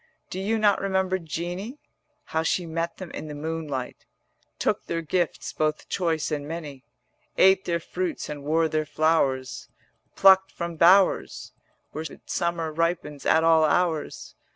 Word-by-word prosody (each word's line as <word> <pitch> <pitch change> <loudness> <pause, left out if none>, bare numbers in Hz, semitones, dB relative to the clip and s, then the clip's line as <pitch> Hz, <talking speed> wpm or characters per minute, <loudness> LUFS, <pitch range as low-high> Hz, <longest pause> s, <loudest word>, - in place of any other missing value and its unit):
Do 185 - -4
you 215 +4 0
not 210 -2 +3
remember 190 -1 0
Jeanie, 175 - -5 0.5
How 160 - -2
she 170 +2 0
met 165 +1 -3
them 185 -3 -8
in - - -7
the 150 - -7
moonlight, 150 -4 -5 0.5
Took - - -1
their 165 0 -2
gifts 175 +1 -2
both 155 0 -1
choice 165 -4 -1
and 145 -1 -3
many, 150 -5 -7 0.5
Ate 190 0 +5
their 170 -1 0
fruits 350 - -4
and 145 -1 -7
wore 160 +2 +2
their 155 0 -1
flowers 140 -5 0 0.5
150 - - -17
Plucked 190 0 +6
from 170 -1 -5
bowers 185 +4 +3 0.4
Where 155 +2 -5 0.2
summer 170 -2 -2
ripens 165 -3 -2
at 160 - +4
all 165 -1 +5
hours? 160 -1 0
165 Hz, 150 wpm, -25 LUFS, 155-185 Hz, 0.5 s, Plucked